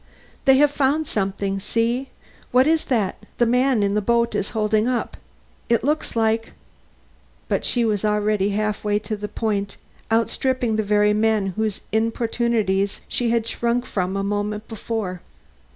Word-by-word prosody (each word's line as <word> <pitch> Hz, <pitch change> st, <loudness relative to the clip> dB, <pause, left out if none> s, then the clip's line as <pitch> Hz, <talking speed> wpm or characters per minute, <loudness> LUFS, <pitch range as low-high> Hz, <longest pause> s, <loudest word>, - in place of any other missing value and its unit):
"They 270 Hz, -1 st, +6 dB
have 290 Hz, +1 st, +5 dB
found 290 Hz, +2 st, +1 dB
something. 195 Hz, -3 st, -2 dB
See! 230 Hz, +6 st, -1 dB, 0.4 s
what 255 Hz, +1 st, +4 dB
is 320 Hz, +1 st, +2 dB
that 220 Hz, -7 st, -1 dB
the 240 Hz, -, +4 dB
man 250 Hz, -1 st, +2 dB
in 200 Hz, 0 st, +1 dB
the 210 Hz, -, +1 dB
boat 235 Hz, +2 st, +1 dB
is 200 Hz, -, -1 dB
holding 215 Hz, +1 st, +2 dB
up? 250 Hz, -1 st, -1 dB, 0.5 s
It 235 Hz, -1 st, +2 dB
looks 300 Hz, 0 st, -1 dB
like 225 Hz, 0 st, +1 dB, 0.5 s
" -, -, -34 dB
But -, -, -1 dB
she 240 Hz, -2 st, +2 dB
was 210 Hz, -2 st, 0 dB
already 210 Hz, -1 st, +1 dB
half 210 Hz, +1 st, -1 dB
way 205 Hz, -1 st, +1 dB
to 215 Hz, +1 st, -4 dB
the 210 Hz, 0 st, -5 dB
point, 205 Hz, -2 st, -2 dB, 0.3 s
outstripping 235 Hz, +1 st, +1 dB
the -, -, +2 dB
very 210 Hz, 0 st, +3 dB
men 210 Hz, -3 st, +1 dB
whose 220 Hz, -2 st, -2 dB
importunities 220 Hz, -3 st, 0 dB
she 240 Hz, -2 st, 0 dB
had 230 Hz, -1 st, +1 dB
shrunk 235 Hz, +1 st, -1 dB
from 190 Hz, -3 st, -2 dB
a 195 Hz, -, -1 dB
moment 205 Hz, +1 st, -2 dB
before. 215 Hz, -5 st, -4 dB
220 Hz, 160 wpm, -22 LUFS, 205-235 Hz, 0.5 s, They